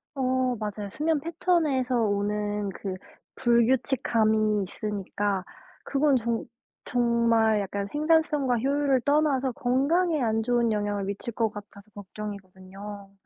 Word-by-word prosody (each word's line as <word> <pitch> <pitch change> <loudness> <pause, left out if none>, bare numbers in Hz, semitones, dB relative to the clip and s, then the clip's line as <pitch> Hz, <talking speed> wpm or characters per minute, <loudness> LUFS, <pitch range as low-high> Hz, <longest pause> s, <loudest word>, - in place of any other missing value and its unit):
어 255 -1 +1
맞아요. 210 -1 -4
수면 310 0 0
패턴에서 310 -6 0
오는 205 0 -1
그 190 0 -5 0.4
불규칙함이 225 -3 +2
있으니까 200 -1 -3 0.4
그건 280 0 +2
정 230 -1 -2 0.4
정말 230 -3 +2
약간 200 +1 -3
생산성과 300 -4 +2
효율을 275 +1 +1
떠나서 285 -3 +2
건강에 290 +6 +1
안 225 -1 +1
좋은 235 -1 +1
영향을 205 -1 -1
미칠 200 +3 -5
것 225 -1 +1
같아서 205 0 -12
걱정이거든요. 200 0 -9
230 Hz, 270 characters per minute, -26 LUFS, 205-265 Hz, 0.4 s, 불규칙함이